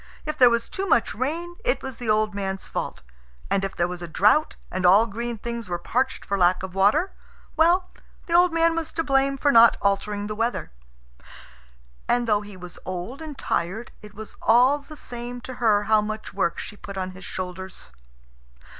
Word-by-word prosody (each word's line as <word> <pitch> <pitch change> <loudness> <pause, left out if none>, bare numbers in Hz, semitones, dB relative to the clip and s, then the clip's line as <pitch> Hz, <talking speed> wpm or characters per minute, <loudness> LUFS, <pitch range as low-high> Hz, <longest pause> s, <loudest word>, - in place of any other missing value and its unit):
If 305 0 -3
there 250 -4 +7
was 235 0 0
too 390 0 -4
much 235 - +2
rain, 330 +8 -3
it - - 0
was 265 -3 -6
the 240 -3 -4
old 215 0 +2
man's 195 -1 -3
fault; - - -5 0.5
and 195 - +2
if 195 - -3
there 175 - +1
was 180 0 -7
a 175 - -5
drought, 210 - +3 0.2
and 185 0 -3
all 195 +5 +6
green 235 +2 -4
things 235 -1 -5
were 175 - -1
parched 255 +9 -1
for 200 0 -1
lack 180 +1 +3
of 190 -1 -6
water, 210 - +3 0.4
well, 345 +3 +4 0.4
the 335 - -4
old 350 +1 +6
man 330 0 +2
was 325 -1 -3
to 330 - -1
blame 275 -1 +2
for 285 +1 +2
not 230 -2 +7
altering 205 +1 0
the 215 - -4
weather. 230 - -2 1.4
And 240 -1 +1
though 210 -2 +2
he 205 -2 -11
was 180 -1 -10
old 185 - -6
and 305 -3 -7
tired, 195 +8 -2
it 210 -2 -13
was 220 +1 -9
all 250 +6 +5
the 300 +2 -13
same 245 -1 -7
to 255 - -7
her 210 -3 +4
how 215 +1 +4
much 215 +1 -5
work 170 -4 0
she - - -7
put 200 -1 -9
on 185 0 -3
his 185 +1 -12
shoulders. 185 - -7
220 Hz, 200 wpm, -24 LUFS, 195-275 Hz, 1.4 s, there